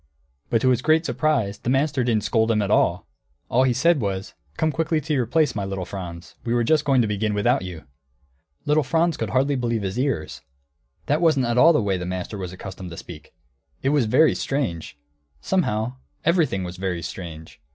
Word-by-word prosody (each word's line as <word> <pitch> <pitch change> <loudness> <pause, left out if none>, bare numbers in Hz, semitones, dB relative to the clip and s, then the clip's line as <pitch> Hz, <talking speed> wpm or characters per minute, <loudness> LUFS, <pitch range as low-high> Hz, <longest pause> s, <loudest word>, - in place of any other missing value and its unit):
But 115 - +2
to 130 - +4
his 125 -1 +2
great 155 +4 +3
surprise 115 -13 0
the - - -3
master 135 0 +1
didn't 115 -3 +1
scold 110 -1 +1
at 105 -3 +1
all. - - +2 0.4
All 130 +2 +3
he 130 - +3
said 165 +2 +3
was, 95 -2 -3 0.2
"Come 160 0 +1
quickly 160 +1 0
to 155 +1 -3
your 125 -5 +1
place, 150 +1 +2
my 100 - -3
little 95 -2 -4
Franz; 85 -3 -8
we 120 0 -1
were 120 - +2
just 155 +5 +2
going 135 -3 +4
to - - 0
begin 105 0 -1
without 120 +6 +2
you!" 90 -4 -7 0.8
Little 150 +1 +3
Franz 165 +4 +1
could - - -3
hardly 135 +2 +1
believe 115 -4 -1
his 95 +5 -3
ears; 130 - -2 0.6
that 150 +3 +1
wasn't 155 -6 +3
at 120 +1 +1
all 165 +5 +8
the 150 -9 +2
way 95 -2 0
the 90 - -4
master 95 +3 -4
was 90 -2 -5
accustomed 95 0 -8
to 85 - -9
speak. 75 -4 -11 0.5
It 135 - +2
was 145 -4 +2
very 130 +8 +4
strange! 105 - -3 0.4
Somehow 125 - -1 0.3
everything 160 - +2
was 90 0 -6
very 90 -3 -3
strange. 80 -3 -8
120 Hz, 200 wpm, -23 LUFS, 95-145 Hz, 0.8 s, all